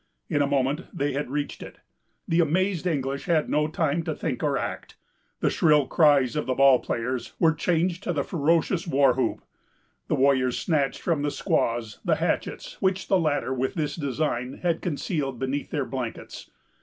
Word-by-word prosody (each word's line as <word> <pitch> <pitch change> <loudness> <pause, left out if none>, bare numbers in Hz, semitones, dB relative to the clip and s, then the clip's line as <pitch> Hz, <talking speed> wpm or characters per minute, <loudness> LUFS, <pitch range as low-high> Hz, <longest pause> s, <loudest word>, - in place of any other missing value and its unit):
In 145 - +1
a 140 - +2
moment 140 +3 0
they 145 -4 -1
had 140 -1 -3
reached 145 +1 -3
it. - - -10 0.5
The 165 - +2
amazed 180 +2 +1
English 140 -4 -2
had 165 -4 +1
no 150 0 +2
time 160 0 0
to 155 - -2
think 135 -7 -3
or 145 -3 +1
act. - - -5 0.5
The - - +2
shrill 150 -3 +4
cries 145 -2 +3
of 150 - -2
the 130 - 0
ball 135 -1 +6
players 125 +1 -3
were 160 -1 +4
changed 170 +3 0
to - - 0
the 145 -5 0
ferocious 165 +3 +1
war 140 -4 +4
whoop. 130 +1 -1 0.6
The - - +1
warriors 130 -2 +2
snatched 150 -6 0
from 165 -4 0
the 145 - 0
squaws 115 -5 -1
the - - +2
hatchets, - - -2
which 190 0 0
the 190 - +4
latter, 145 -5 0
with 130 +7 -2
this 155 -4 -2
design, 140 -4 -2
had 170 -2 +1
concealed 145 -5 -2
beneath 135 +3 -3
their 145 -4 -1
blankets. 125 -4 -6
145 Hz, 180 wpm, -25 LUFS, 135-165 Hz, 0.6 s, ball